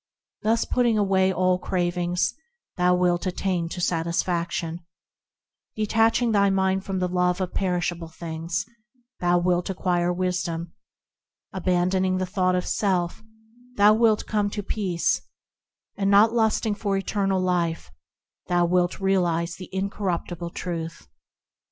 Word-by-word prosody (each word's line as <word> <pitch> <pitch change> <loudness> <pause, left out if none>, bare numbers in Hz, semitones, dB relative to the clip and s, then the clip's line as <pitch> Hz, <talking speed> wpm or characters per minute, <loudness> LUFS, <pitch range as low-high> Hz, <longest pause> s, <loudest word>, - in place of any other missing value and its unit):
Thus 225 +2 +1
putting 240 -3 +2
away 190 -2 +3
all 185 0 +2
cravings, 175 -1 0 0.4
thou 180 0 +3
wilt 180 0 +1
attain 180 -2 -1
to 180 - -6
satisfaction; 170 0 -1 1.0
Detaching 225 +2 +2
thy 200 -2 +4
mind 190 0 +1
from 195 -1 -3
the 180 0 0
love 180 0 +1
of 185 -1 -3
perishable 175 -2 -1
things, 165 +1 -4 0.5
thou 175 0 +3
wilt 175 0 +1
acquire 175 -2 0
wisdom; 175 -2 -2 0.8
Abandoning 185 0 +1
the 185 - -1
thought 185 -1 +1
of 180 - -1
self, 180 -3 0 0.6
thou 205 +1 +7
wilt 220 -1 +3
come 210 -1 0
to 205 0 -4
peace; 190 -5 0 0.7
And 195 -1 0
not 210 +3 +6
lusting 220 -1 +1
for 200 -1 -1
eternal 195 -1 0
life, 175 - -1 0.6
thou 175 -1 +2
wilt 175 0 +1
realise 175 -3 +1
the 185 - -10
incorruptible 185 -3 -3
Truth. 165 -1 -5
185 Hz, 125 wpm, -25 LUFS, 175-195 Hz, 1.0 s, thou